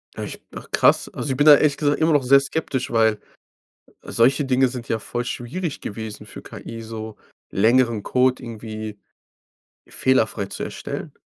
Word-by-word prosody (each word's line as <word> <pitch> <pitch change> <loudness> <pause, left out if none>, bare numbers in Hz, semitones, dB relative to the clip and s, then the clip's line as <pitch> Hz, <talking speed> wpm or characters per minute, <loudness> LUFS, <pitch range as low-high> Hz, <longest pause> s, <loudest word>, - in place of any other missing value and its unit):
Echt? - - -6
Ach - - -9
krass. - - +3
Also, 145 - -4
ich 130 - -2
bin 145 - +3
da 150 - +11
ehrlich 145 -1 +2
gesagt 145 0 +1
immer 160 0 +3
noch 145 -2 +3
sehr 135 +2 +6
skeptisch, 135 -2 -3
weil 110 -2 +3 0.8
solche 130 +5 +2
Dinge 130 0 +3
sind 125 -2 -7
ja 110 - -1
voll 120 +3 -4
schwierig 140 +7 -4
gewesen 110 0 -7
für - - -10
KI, 115 0 -9
so 110 -1 -7 0.3
längeren 115 +1 +3
Code 130 +3 +2
irgendwie 110 -3 -7 0.9
fehlerfrei 110 -5 +1
zu - - -7
erstellen. - - -6
125 Hz, 160 wpm, -22 LUFS, 110-135 Hz, 0.9 s, da